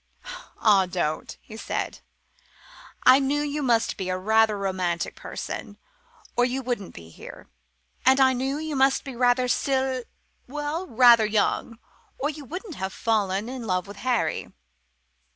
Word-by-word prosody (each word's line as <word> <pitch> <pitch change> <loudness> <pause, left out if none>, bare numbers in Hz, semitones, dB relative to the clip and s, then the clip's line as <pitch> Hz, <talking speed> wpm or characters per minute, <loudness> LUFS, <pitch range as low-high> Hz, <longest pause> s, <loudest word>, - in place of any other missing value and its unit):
"Ah, 200 -4 +4
don't!" 175 -4 -3
he 220 - -11
said; 225 - -4 1.0
"I 255 +1 +8
knew 285 +2 0
you 295 0 -2
must 235 -4 +1
be 190 -2 -4
a 185 - -1
very 220 +3 +4
romantic 185 -3 -2
person, - - -7 0.6
or 245 - +3
you 260 +2 -1
wouldn't 240 -6 -4
be 80 -1 -11
here; - - -12 0.5
and 265 +1 +5
I 260 -1 +5
knew 265 +3 -2
you 310 -1 -4
must 270 0 +3
be 265 -2 -7
rather 245 +1 +3
sill 265 0 0 0.5
well, 295 +6 -4
rather 235 -3 +6
young, 215 +2 0 0.4
or 290 +3 -1
you 295 -1 -10
wouldn't 360 - -7
have 190 0 -4
fallen 205 -2 0
in 250 -2 -6
love 185 -1 0
with 200 0 -11
Harry. 245 +3 -1
245 Hz, 150 wpm, -25 LUFS, 200-270 Hz, 1.0 s, I